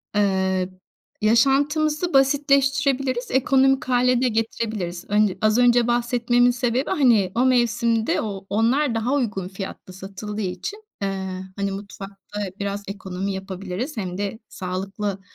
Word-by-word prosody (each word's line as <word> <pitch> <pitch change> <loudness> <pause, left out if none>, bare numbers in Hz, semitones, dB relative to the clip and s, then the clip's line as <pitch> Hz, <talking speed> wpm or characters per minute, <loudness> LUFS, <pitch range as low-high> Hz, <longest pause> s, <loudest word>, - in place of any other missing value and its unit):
Eee, 190 -2 +1 0.5
yaşantımızı 290 +8 +2
basitleştirebiliriz, 275 -2 +2
ekonomik 270 +2 +3
hâle 250 0 +2
de 260 - +3
getirebiliriz. 220 -6 -2
Önce 205 -2 +2
az 215 +1 +3
önce 245 -1 +4
bahsetmemin 240 0 +2
sebebi, 245 +2 -1
hani, 230 -10 +3
o 245 +2 +3
mevsimde 235 -3 +2
o 195 -3 -5
onlar 235 +5 +2
daha 225 +4 0
uygun 215 -9 -1
fiyatlı 190 -1 -8
satıldığı 200 +3 -6
için, 190 - -5 0.2
eee, 190 -1 -3
hani, 200 0 -2
mutfakta 200 +1 -8 0.2
biraz 200 0 -3
ekonomi 195 0 -4
yapabiliriz 190 - -5
hem 185 -3 -3
de 205 +2 -3
sağlıklı 195 +2 -4
220 Hz, 120 wpm, -23 LUFS, 195-255 Hz, 0.5 s, önce